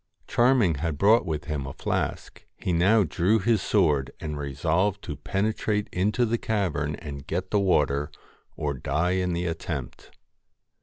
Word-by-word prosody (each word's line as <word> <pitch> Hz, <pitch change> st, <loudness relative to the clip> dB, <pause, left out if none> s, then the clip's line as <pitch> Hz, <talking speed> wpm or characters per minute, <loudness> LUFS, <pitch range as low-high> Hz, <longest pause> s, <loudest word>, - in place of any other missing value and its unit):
Charming 120 Hz, -, +3 dB
had 80 Hz, -3 st, -1 dB
brought 105 Hz, +4 st, +4 dB
with 75 Hz, -1 st, -2 dB
him 75 Hz, -4 st, -3 dB
a -, -, -6 dB
flask: -, -, -3 dB
he 90 Hz, -, -2 dB
now 100 Hz, +6 st, +4 dB
drew 95 Hz, +5 st, +2 dB
his 110 Hz, 0 st, +2 dB
sword 75 Hz, -12 st, +2 dB
and 75 Hz, -1 st, -4 dB
resolved 80 Hz, +8 st, 0 dB
to -, -, -5 dB
penetrate 105 Hz, +1 st, -1 dB
into 105 Hz, +7 st, +1 dB
the 115 Hz, +1 st, 0 dB
cavern 80 Hz, -9 st, -1 dB
and 70 Hz, -3 st, -8 dB
get 90 Hz, +3 st, -3 dB
the 105 Hz, -, +3 dB
water, 75 Hz, -6 st, +2 dB, 0.5 s
or 75 Hz, -1 st, -1 dB
die 70 Hz, +7 st, -1 dB
in 90 Hz, -1 st, 0 dB
the 85 Hz, +1 st, -2 dB
attempt. 80 Hz, -2 st, -5 dB
90 Hz, 155 wpm, -26 LUFS, 75-105 Hz, 0.5 s, brought